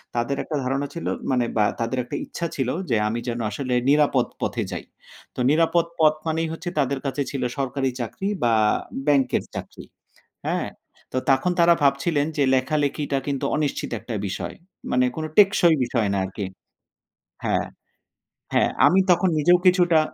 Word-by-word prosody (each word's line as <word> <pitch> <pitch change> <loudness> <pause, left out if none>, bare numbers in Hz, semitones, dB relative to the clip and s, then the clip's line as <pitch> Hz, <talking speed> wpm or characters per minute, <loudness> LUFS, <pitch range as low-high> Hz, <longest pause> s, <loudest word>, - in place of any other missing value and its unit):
তাদের 120 +4 0
একটা 155 - -4
ধারণা 135 +2 -1
ছিল, 170 - -6 0.3
মানে 125 -2 +2
বা 105 - +4
তাদের 115 +3 -1
একটা 120 - -6
ইচ্ছা 170 - -5
ছিল 130 -3 -1 0.2
যে 115 - +2
আমি 115 +2 -2
যেন 120 0 -2
আসলে 125 +4 -3 0.2
নিরাপদ 145 -4 +4 0.2
পথে - - -1
যাই। - - -5 0.5
তো - - -8
নিরাপদ 165 +2 +3
পথ 155 -1 +6
মানেই 160 +1 0
হচ্ছে 175 +2 -5
তাদের 140 0 0
কাছে 135 +1 -1
ছিল 135 -3 -3
সরকারি 135 0 -1
চাকরি 125 - -4 0.2
বা 115 - +3 0.5
ব্যাংকের 140 -3 +2
চাকরি। - - -8 0.6
হ্যাঁ? - - -1 0.4
তো 130 - 0
তখন 135 +7 +3
তারা 170 0 +6
ভাবছিলেন 145 +2 +2
যে 145 - +2
লেখালেখিটা 140 +1 0
কিন্তু 140 -2 -2
অনিশ্চিত 150 -2 -2
একটা 115 - -6
বিষয়। 95 - -4 0.4
মানে 125 0 +3
কোন 160 - -3
টেকসই 195 -5 +6
বিষয় 120 -3 0
না 100 - 0
আরকি 95 +2 -5 1.0
হ্যাঁ, - - +1 0.9
হ্যাঁ - - +3 0.2
আমি 190 - +5
তখন 180 +1 +4
নিজেও 175 +4 +5
কিছুটা 175 -3 +5
140 Hz, 160 wpm, -23 LUFS, 125-160 Hz, 1.0 s, পথ